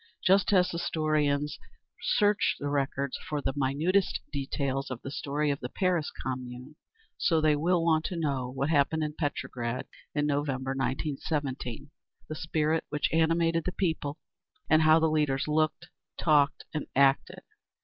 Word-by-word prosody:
Just 190 Hz, +1 st, +4 dB
as 180 Hz, -2 st, +4 dB
historians 155 Hz, -3 st, 0 dB, 0.4 s
search 205 Hz, -1 st, +2 dB
the 145 Hz, -, -2 dB
records 140 Hz, -1 st, -1 dB
for 150 Hz, -, -4 dB
the 135 Hz, -, -2 dB
minutest 150 Hz, +8 st, +1 dB
details 135 Hz, -1 st, -2 dB
of 130 Hz, -3 st, -5 dB
the 135 Hz, -, -5 dB
story 145 Hz, +1 st, -1 dB
of 140 Hz, -, -3 dB
the 125 Hz, -, -5 dB
Paris 180 Hz, -3 st, 0 dB
Commune, 125 Hz, +2 st, -6 dB, 0.4 s
so 165 Hz, -3 st, +3 dB
they 155 Hz, -1 st, +3 dB
will 165 Hz, +3 st, +1 dB
want 160 Hz, -1 st, +3 dB
to 185 Hz, -, -3 dB
know 140 Hz, -6 st, -1 dB
what 135 Hz, +4 st, -2 dB
happened 155 Hz, +1 st, +2 dB
in 150 Hz, 0 st, -3 dB
Petrograd 125 Hz, -5 st, -3 dB, 0.3 s
in 145 Hz, 0 st, +1 dB
November, 140 Hz, -2 st, -1 dB
1917, 135 Hz, 0 st, -3 dB, 0.4 s
the -, -, -5 dB
spirit 160 Hz, 0 st, 0 dB
which 150 Hz, +1 st, -1 dB
animated 165 Hz, 0 st, +2 dB
the 185 Hz, -, -2 dB
people, 160 Hz, -6 st, -2 dB, 0.5 s
and 155 Hz, 0 st, +5 dB
how 155 Hz, 0 st, +6 dB
the 160 Hz, -, +3 dB
leaders 150 Hz, -4 st, +1 dB
looked, 155 Hz, +3 st, 0 dB, 0.3 s
talked 150 Hz, -3 st, +3 dB
and 155 Hz, -, -3 dB
acted. 135 Hz, 0 st, +2 dB
150 Hz, 150 wpm, -29 LUFS, 135-160 Hz, 0.5 s, how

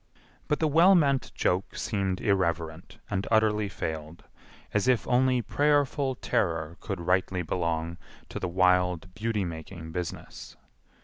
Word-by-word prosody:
But 150 Hz, -, +1 dB
the 160 Hz, -, +2 dB
well 170 Hz, +6 st, +6 dB
meant 140 Hz, -6 st, +2 dB
joke 90 Hz, +2 st, 0 dB
seemed 95 Hz, -3 st, -1 dB
irreverent 85 Hz, -5 st, -1 dB
and 100 Hz, 0 st, -1 dB
utterly 105 Hz, -2 st, +2 dB
failed, 80 Hz, -2 st, -5 dB, 0.5 s
as 105 Hz, +3 st, +1 dB
if 125 Hz, -4 st, +2 dB
only 125 Hz, 0 st, +3 dB
prayerful 145 Hz, 0 st, +1 dB
terror 85 Hz, -10 st, -1 dB
could 100 Hz, -4 st, -5 dB
rightly 90 Hz, +1 st, 0 dB
belong 85 Hz, 0 st, -2 dB, 0.3 s
to -, -, -5 dB
the 90 Hz, -, -2 dB
wild 90 Hz, 0 st, +2 dB
beauty 105 Hz, -1 st, -1 dB
making 80 Hz, 0 st, -7 dB
business. 90 Hz, -1 st, -6 dB
95 Hz, 130 wpm, -28 LUFS, 85-120 Hz, 0.5 s, well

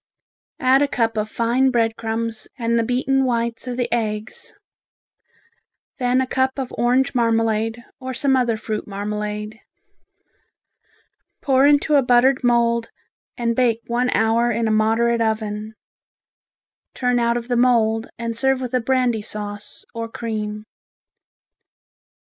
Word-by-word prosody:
Add 265 Hz, -1 st, +4 dB
a 290 Hz, -, +3 dB
cup 230 Hz, -5 st, 0 dB
of 215 Hz, 0 st, -2 dB
fine 240 Hz, +4 st, +2 dB
bread 230 Hz, -3 st, +1 dB
crumbs 225 Hz, 0 st, -3 dB
and 235 Hz, -1 st, +1 dB
the -, -, +2 dB
beaten 260 Hz, +3 st, +1 dB
whites 235 Hz, -1 st, -1 dB
of 245 Hz, -1 st, -4 dB
the 245 Hz, -1 st, 0 dB
eggs; 215 Hz, -2 st, -3 dB, 1.5 s
then 250 Hz, 0 st, +2 dB
a -, -, 0 dB
cup 260 Hz, +1 st, 0 dB
of 265 Hz, -2 st, -4 dB
orange 250 Hz, +3 st, +2 dB
marmalade, 225 Hz, -1 st, 0 dB
or 260 Hz, 0 st, -5 dB
some 265 Hz, +1 st, +2 dB
other 240 Hz, -3 st, +1 dB
fruit 215 Hz, 0 st, -4 dB
marmalade. 210 Hz, +1 st, -4 dB, 1.8 s
Pour 270 Hz, -1 st, +4 dB
into 290 Hz, +1 st, +4 dB
a -, -, +5 dB
buttered 250 Hz, +1 st, +3 dB
mould 235 Hz, -1 st, +2 dB, 0.5 s
and 235 Hz, -2 st, 0 dB
bake 235 Hz, -2 st, +2 dB
one 245 Hz, +1 st, 0 dB
hour 230 Hz, +1 st, +2 dB
in 230 Hz, -1 st, 0 dB
a -, -, +1 dB
moderate 225 Hz, +2 st, +2 dB
oven. 220 Hz, -1 st, -2 dB, 1.2 s
Turn 250 Hz, -1 st, +1 dB
out 235 Hz, 0 st, +1 dB
of 235 Hz, 0 st, -6 dB
the 245 Hz, -, 0 dB
mould 230 Hz, -2 st, +2 dB
and 230 Hz, 0 st, -3 dB
serve 265 Hz, +2 st, +2 dB
with 255 Hz, -1 st, -5 dB
a 255 Hz, -, +2 dB
brandy 250 Hz, -2 st, +1 dB
sauce, 205 Hz, 0 st, -7 dB
or 230 Hz, 0 st, -5 dB
cream. 215 Hz, -2 st, -4 dB
235 Hz, 135 wpm, -21 LUFS, 220-250 Hz, 1.8 s, a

